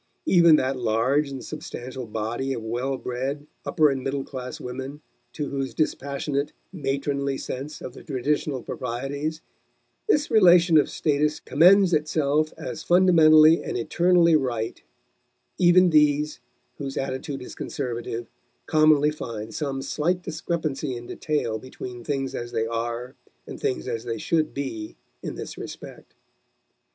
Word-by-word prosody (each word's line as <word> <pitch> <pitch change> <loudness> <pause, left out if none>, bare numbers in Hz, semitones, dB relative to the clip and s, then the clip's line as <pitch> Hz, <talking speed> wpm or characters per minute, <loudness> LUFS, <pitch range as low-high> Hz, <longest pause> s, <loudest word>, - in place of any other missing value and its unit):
Even 170 - +6
that 130 -2 0
large 125 +6 +1
and 135 -2 -7
substantial 125 0 -7
body 115 +5 -2
of 115 - -5
well 125 +4 -2
bred, 135 +4 -4 0.2
upper 155 -4 +3
and 135 -1 -3
middle 135 0 -2
class 125 -2 -7
women 130 +3 -6 0.3
to 150 -2 -3
whose 135 -1 -3
dispassionate, 140 -1 -1 0.2
matronly 140 -3 -1
sense 140 +4 -6
of 125 - -7
the - - -11
traditional 140 -1 -1
proprieties 140 +6 -4 0.7
this 295 -7 +2
relation 175 -6 +6
of - - +1
status 150 0 0
commends 180 +4 +5
itself 155 0 +1
as 155 - -6
fundamentally 160 -3 +6
and - - -3
eternally 170 +6 +3
right 120 -6 -1 0.8
even 180 0 +6
these, 150 0 +3 0.4
whose 135 -2 -5
attitude 135 +1 -3
is - - -9
conservative, 120 -4 -4 0.4
commonly 155 -1 +4
find 110 -7 -6
some 135 -1 -3
slight 180 +4 -1
discrepancy 155 -5 -3
in 120 0 -8
detail 120 -6 -2
between 125 0 -8
things 135 0 -2
as 120 0 -5
they 110 - 0
are 120 +2 -3 0.3
and - - -8
things 65 - -2
as 115 0 -3
they 115 -1 -3
should 155 +6 0
be 115 -6 -5 0.3
in - - -5
this - - -7
respect. - - -10
140 Hz, 135 wpm, -25 LUFS, 125-155 Hz, 0.8 s, Even